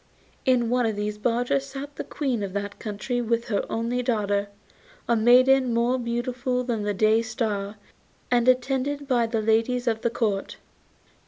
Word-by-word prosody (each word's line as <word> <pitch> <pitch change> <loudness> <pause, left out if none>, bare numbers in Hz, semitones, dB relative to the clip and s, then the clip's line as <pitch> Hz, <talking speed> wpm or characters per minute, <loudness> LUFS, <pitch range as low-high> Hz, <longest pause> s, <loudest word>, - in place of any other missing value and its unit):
In 240 -2 +3
one 245 -2 +2
of 220 - -2
these 210 0 -3
barges 245 +4 +1
sat 275 +1 -8
the - - -4
Queen 260 -7 -2
of 195 -2 -4
that 200 0 -4
country 245 +4 -3
with 235 0 -1
her 205 - 0
only 235 +2 -1
daughter, 205 -4 0 0.6
a 235 - +3
maiden 250 +2 +5
more 240 +2 +2
beautiful 250 +1 -2
than 235 -3 -2
the 205 0 -1
Day 215 +3 +3
Star, 215 -3 -3 0.6
and 240 0 +3
attended 270 +3 +1
by 240 -3 +2
the 225 -1 -1
ladies 230 +3 +1
of 225 -2 0
the 235 - +1
Court. 210 -4 -2
235 Hz, 165 wpm, -25 LUFS, 220-250 Hz, 0.6 s, maiden